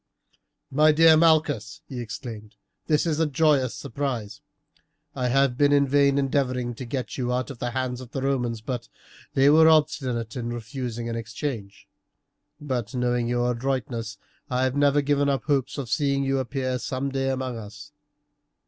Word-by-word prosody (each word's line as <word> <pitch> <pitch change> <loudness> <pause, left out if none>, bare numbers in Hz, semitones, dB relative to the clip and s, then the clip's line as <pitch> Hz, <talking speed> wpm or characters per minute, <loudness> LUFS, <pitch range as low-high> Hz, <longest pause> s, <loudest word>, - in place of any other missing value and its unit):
"My 155 +3 +5
dear 160 +1 +6
Malchus," 155 -2 +2
he 130 - -6
exclaimed, 110 -2 -8 0.3
"this 150 0 +2
is 160 -2 0
a 160 - +3
joyous 145 -3 +2
surprise. 115 -6 -4 0.7
I 125 - -1
have 135 0 +2
been 145 -1 +4
in 140 -1 +4
vain 140 0 +3
endeavouring 130 -3 0
to 125 +2 -7
get 130 +2 -4
you 125 -1 -1
out 125 +2 -1
of 125 - -10
the 120 - -2
hands 125 0 -3
of 125 - -10
the 135 - -4
Romans, 120 -5 -1
but 120 +1 -4 0.5
they 135 +1 +5
were 160 +1 +7
obstinate 130 -7 +1
in 120 -2 -3
refusing 120 0 -5
an 115 - -3
exchange; 110 -2 -5 0.7
but 130 -5 -3
knowing 125 -1 0
your 120 0 +1
adroitness, 120 -3 -3 0.3
I 130 0 0
have 130 0 0
never 145 0 +3
given 145 0 +2
up 135 -1 0
hopes 140 -3 0
of 140 -3 -4
seeing 140 +4 +1
you 135 0 0
appear 130 0 -2
some 135 +2 -3
day 135 0 -1
among 130 -3 -3
us. 110 +7 -11
130 Hz, 165 wpm, -25 LUFS, 120-140 Hz, 0.7 s, were